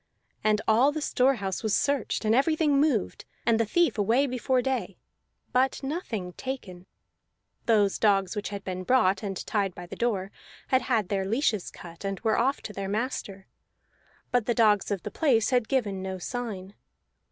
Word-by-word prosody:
And 215 Hz, 0 st, +2 dB
all 240 Hz, +6 st, +5 dB
the 310 Hz, -, -3 dB
store 270 Hz, -2 st, +2 dB
house 195 Hz, -5 st, -3 dB
was 220 Hz, -3 st, +1 dB
searched 280 Hz, -5 st, 0 dB
and 215 Hz, -, +3 dB
everything 295 Hz, +2 st, +3 dB
moved, 280 Hz, -10 st, 0 dB, 0.2 s
and 230 Hz, -1 st, +3 dB
the 230 Hz, -, +1 dB
thief 340 Hz, -2 st, +2 dB
away 230 Hz, +7 st, +3 dB
before 255 Hz, 0 st, 0 dB
day, 245 Hz, -7 st, -2 dB, 0.6 s
but 260 Hz, +2 st, +1 dB
nothing 235 Hz, -, -4 dB
taken. 185 Hz, -9 st, -7 dB, 0.8 s
Those 210 Hz, -4 st, +3 dB
dogs 195 Hz, -2 st, +2 dB
which 210 Hz, -, -3 dB
had 200 Hz, -1 st, -6 dB
been 185 Hz, -1 st, -4 dB
brought 195 Hz, -4 st, +3 dB
and 195 Hz, -3 st, -4 dB
tied 200 Hz, -4 st, -1 dB
by 175 Hz, -, -8 dB
the 175 Hz, -, -8 dB
door 200 Hz, -5 st, -1 dB, 0.4 s
had 260 Hz, 0 st, +3 dB
had 225 Hz, -6 st, 0 dB
their 195 Hz, -1 st, 0 dB
leashes 220 Hz, -2 st, 0 dB
cut, 170 Hz, +1 st, -12 dB
and 195 Hz, -1 st, -3 dB
were 220 Hz, -2 st, +2 dB
off 265 Hz, +4 st, +1 dB
to 210 Hz, -, -7 dB
their 195 Hz, -1 st, -4 dB
master; 205 Hz, -3 st, -3 dB, 0.9 s
but 245 Hz, -3 st, +1 dB
the 240 Hz, -, +1 dB
dogs 215 Hz, -4 st, +3 dB
of 200 Hz, -3 st, -2 dB
the 210 Hz, -, -5 dB
place 245 Hz, -5 st, +2 dB
had 245 Hz, -3 st, +2 dB
given 210 Hz, -8 st, 0 dB
no 190 Hz, 0 st, -4 dB
sign. 200 Hz, -2 st, -5 dB
220 Hz, 175 wpm, -27 LUFS, 195-255 Hz, 0.9 s, all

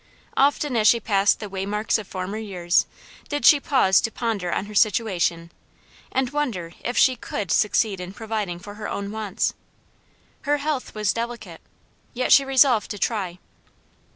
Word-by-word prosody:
Often 285 Hz, -1 st, +2 dB
as 215 Hz, -1 st, +3 dB
she 235 Hz, -, +5 dB
passed 200 Hz, -2 st, +2 dB
the 210 Hz, -, -6 dB
waymarks 200 Hz, +3 st, -1 dB
of 210 Hz, -, -8 dB
former 190 Hz, +3 st, -5 dB
years 180 Hz, -5 st, 0 dB, 0.4 s
did 290 Hz, -1 st, -2 dB
she 295 Hz, -3 st, +8 dB
pause 260 Hz, -10 st, +3 dB
to -, -, -1 dB
ponder 215 Hz, -8 st, -2 dB
on -, -, -1 dB
her 210 Hz, -, -10 dB
situation, 190 Hz, -6 st, +1 dB, 0.6 s
and 260 Hz, -1 st, 0 dB
wonder 225 Hz, -, -3 dB
if 245 Hz, -, -3 dB
she 260 Hz, -, +5 dB
COULD 200 Hz, -7 st, -5 dB
succeed 210 Hz, -2 st, +2 dB
in 180 Hz, 0 st, -6 dB
providing 210 Hz, -4 st, -4 dB
for 205 Hz, +3 st, -10 dB
her -, -, -4 dB
own 200 Hz, 0 st, -4 dB
wants. 215 Hz, -3 st, -2 dB, 0.9 s
Her 290 Hz, +1 st, +1 dB
health 290 Hz, -4 st, -3 dB
was 210 Hz, -2 st, 0 dB
delicate, 235 Hz, +1 st, -6 dB, 0.5 s
yet 255 Hz, +1 st, -1 dB
she 275 Hz, -, +8 dB
resolved 265 Hz, -4 st, +3 dB
to 205 Hz, -, -5 dB
try. 195 Hz, -5 st, -2 dB
215 Hz, 160 wpm, -23 LUFS, 195-245 Hz, 0.9 s, she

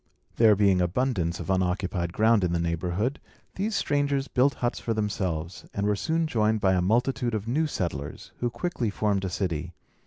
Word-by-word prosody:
There 110 Hz, -2 st, +6 dB
being 100 Hz, -2 st, +3 dB
abundance 90 Hz, -2 st, 0 dB
of -, -, -3 dB
unoccupied 90 Hz, -1 st, 0 dB
ground 110 Hz, +1 st, +3 dB
in 85 Hz, -1 st, +1 dB
the 85 Hz, -, +1 dB
neighbourhood, 85 Hz, -, -1 dB, 0.3 s
these 210 Hz, +3 st, -2 dB
strangers 140 Hz, -1 st, 0 dB
built 135 Hz, +3 st, +2 dB
huts 120 Hz, -1 st, -1 dB
for 115 Hz, -, -2 dB
themselves, 95 Hz, -5 st, -2 dB
and 100 Hz, -, 0 dB
were 105 Hz, 0 st, +2 dB
soon 160 Hz, +9 st, 0 dB
joined 110 Hz, -6 st, +1 dB
by 95 Hz, -2 st, +3 dB
a 90 Hz, -, +2 dB
multitude 120 Hz, +4 st, +1 dB
of 110 Hz, 0 st, -4 dB
new 155 Hz, +7 st, +1 dB
settlers, 80 Hz, -, -4 dB
who 120 Hz, -, 0 dB
quickly 125 Hz, -4 st, -2 dB
formed 100 Hz, -1 st, 0 dB
a -, -, -2 dB
city. 85 Hz, -3 st, -3 dB
105 Hz, 180 wpm, -27 LUFS, 90-125 Hz, 0.3 s, There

